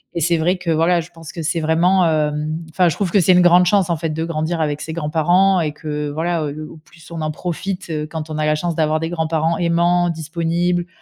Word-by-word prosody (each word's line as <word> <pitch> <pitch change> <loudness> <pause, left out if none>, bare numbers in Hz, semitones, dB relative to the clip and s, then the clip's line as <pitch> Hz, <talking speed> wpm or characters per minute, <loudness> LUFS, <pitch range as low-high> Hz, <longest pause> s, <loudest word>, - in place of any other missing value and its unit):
et 170 - -1
c'est 170 +2 +2
vrai 175 +4 +1
que, 180 -2 -2
voilà, 165 +2 +2
je 165 - -13
pense 165 -2 -11
que 165 - -6
c'est 165 +2 -1
vraiment, 170 +4 +3
hem, 150 0 -1
enfin, 180 +1 +3
je 155 - -3
trouve 190 -4 -2
que 205 - +4
c'est 185 +2 +4
une 180 - +5
grande 175 +1 +5
chance, 190 -2 +2
en - - +2
fait, 165 +1 -3
de 160 +1 -3
grandir 165 +1 -2
avec 150 -2 -1
ses 160 - -5
grands-parents 170 +4 +2
et 150 - -1
que, 150 0 -4
voilà, 165 +3 -1
heu, 150 +1 -6
au - - -12
plus 160 +1 -18
on 165 - -5
en 155 - -1
profite, 180 +3 -4
heu, 150 -1 -3
quand 160 0 -6
on 155 - -3
a 155 - 0
la 150 - +2
chance 170 +2 -2
d'avoir 155 -1 +1
des 165 - -3
grands-parents 160 0 -1
aimants, 175 +1 +2
disponibles, 170 +2 -1
165 Hz, 250 wpm, -19 LUFS, 155-175 Hz, -, une